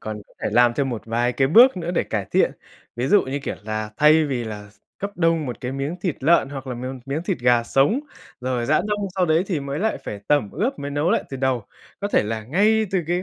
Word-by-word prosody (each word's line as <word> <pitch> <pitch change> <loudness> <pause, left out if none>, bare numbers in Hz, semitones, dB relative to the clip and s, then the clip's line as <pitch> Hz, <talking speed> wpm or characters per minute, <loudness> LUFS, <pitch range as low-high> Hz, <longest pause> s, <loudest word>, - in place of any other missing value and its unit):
còn 110 -1 -6
có - - -27
thể - - 0
làm 120 +1 +4
thêm 140 -2 0
một 120 -4 -4
vài 120 +2 0
cái 135 +1 +1
bước 240 - +7
nữa 175 -1 -3
để 180 - +1
cải - - -3
thiện. - - +3 0.4
Ví 120 +2 -1
dụ 205 +8 +5
như, 135 +2 -3
kiểu 140 - -5
là, 110 0 -3
thay 155 +3 +5
vì 130 -5 -2
là 105 -2 -7 0.3
cấp 200 - -3
đông 165 -3 +1
1 125 - -6
cái 125 -1 -4
miếng 140 +5 -3
thịt 175 -5 -2
lợn 165 -2 +4
hoặc 135 -1 -7
là 130 - -4
miếng 130 +2 -6
miếng 140 +4 -2
thịt 175 - -2
gà 120 -1 +3
sống, 140 - +2 0.4
rồi 125 -1 -2
rã 155 +2 +3
đông 210 -1 -1
sau 185 -2 +1
đấy 160 +2 +3
thì 170 -7 -1
mới 140 +2 -4
lại 220 +3 0
phải 100 - -6
tẩm 145 -9 +2
ướp 235 - -2
mới 145 0 -5
nấu 145 +5 0
lại 230 - +1
từ 135 - -4
đầu. 130 -4 0 0.4
Có 205 - -1
thể - - +3
là 110 0 -4
ngay 215 - +2
từ 195 - +1
cái 175 +2 0
140 Hz, 260 wpm, -22 LUFS, 120-175 Hz, 0.4 s, bước